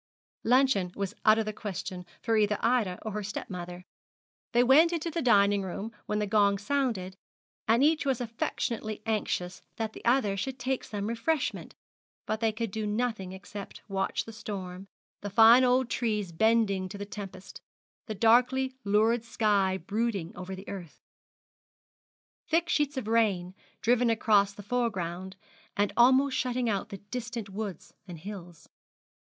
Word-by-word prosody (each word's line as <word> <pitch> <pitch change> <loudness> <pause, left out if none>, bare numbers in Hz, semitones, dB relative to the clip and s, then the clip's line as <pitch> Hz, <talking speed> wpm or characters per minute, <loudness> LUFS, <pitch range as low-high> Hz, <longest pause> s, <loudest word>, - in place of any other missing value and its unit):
Luncheon 245 -7 +3
was 200 -2 -3
out 215 0 +7
of 225 - 0
the 215 - -3
question 190 -3 -6 0.2
for 225 -1 +1
either 210 -1 +2
Ida 225 -7 +1
or 220 - -4
her 210 +1 -3
stepmother. 180 -3 -6 0.7
They 240 0 +4
went 300 +7 +6
into 335 0 -2
the 335 +1 -2
dining 205 -4 +4
room 195 +4 -5 0.2
when 210 - -1
the 210 - 0
gong 200 -1 +3
sounded, 205 -5 -1 0.5
and 230 +4 +4
each 310 +2 +3
was 270 -4 0
affectionately 225 -2 -3
anxious 185 -4 -2
that 220 -1 -3
the - - -11
other 235 -5 +2
should 255 +7 -3
take 255 +1 -2
some 205 -1 -4
refreshment; 235 +7 -2 0.5
but 215 - -2
they 225 -1 +2
could 225 -1 -4
do 215 +1 -3
nothing 215 -3 -2
except 200 +1 -9
watch 195 -1 -1
the 225 - -9
storm, 190 -3 -6 0.3
the 205 - -4
fine 225 +4 +7
old 255 0 +3
trees 215 -6 -1
bending 200 0 +2
to 200 - -7
the 200 - -5
tempest, 195 -2 -9 0.5
the 215 - -4
darkly 250 +5 +3
lurid 220 +3 +2
sky 205 -5 +1
brooding 200 -1 -2
over 185 +1 -6
the 190 +2 -11
earth, 175 -6 -8 1.5
thick 335 +1 +1
sheets 295 -4 +1
of 245 -5 -3
rain, 205 -6 +1 0.3
driven 245 +1 +3
across 210 -3 +3
the 205 +1 -11
foregound, 190 -6 -2 0.4
and 205 0 +1
almost 260 +3 +5
shutting 250 -1 0
out 200 -3 -1
the 200 - -6
distant 235 -3 -4
woods 200 -1 -6
and 175 -2 -8
hills. 180 -4 -9
215 Hz, 155 wpm, -29 LUFS, 195-240 Hz, 1.5 s, out